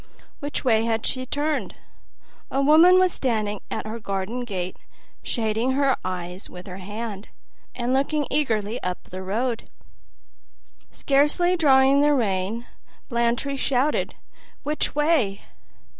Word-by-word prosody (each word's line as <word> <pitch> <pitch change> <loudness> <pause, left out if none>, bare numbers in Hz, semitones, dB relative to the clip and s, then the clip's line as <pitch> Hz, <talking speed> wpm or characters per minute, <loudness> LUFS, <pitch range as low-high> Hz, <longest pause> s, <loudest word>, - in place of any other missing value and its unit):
Which 285 -1 -4
way 225 -2 +3
had 225 -1 0
she 255 -1 -2
turned? 295 +3 -1 0.7
A 270 - -1
woman 320 +6 +7
was 370 -1 +4
standing 215 -5 -1
at - - -4
her 220 +2 -5
garden 200 +3 -3
gate, 185 -5 -4 0.4
shading 225 +3 0
her 275 -1 +3
eyes 180 0 -5
with 180 0 -10
her 185 -1 -8
hand, 205 +1 -6 0.5
and 245 +1 -1
looking 285 +2 +1
eagerly 225 -6 0
up 180 0 -3
the 185 +1 -8
road. 230 +5 -2 1.2
Scarcely 295 +6 +2
drawing 275 -3 +5
the 295 0 +4
rein, 210 0 -1 0.4
Blantyre 235 +3 0
shouted, 270 +2 0 0.5
"Which 300 0 -1
way?" 295 -10 +2
240 Hz, 125 wpm, -24 LUFS, 205-280 Hz, 1.2 s, woman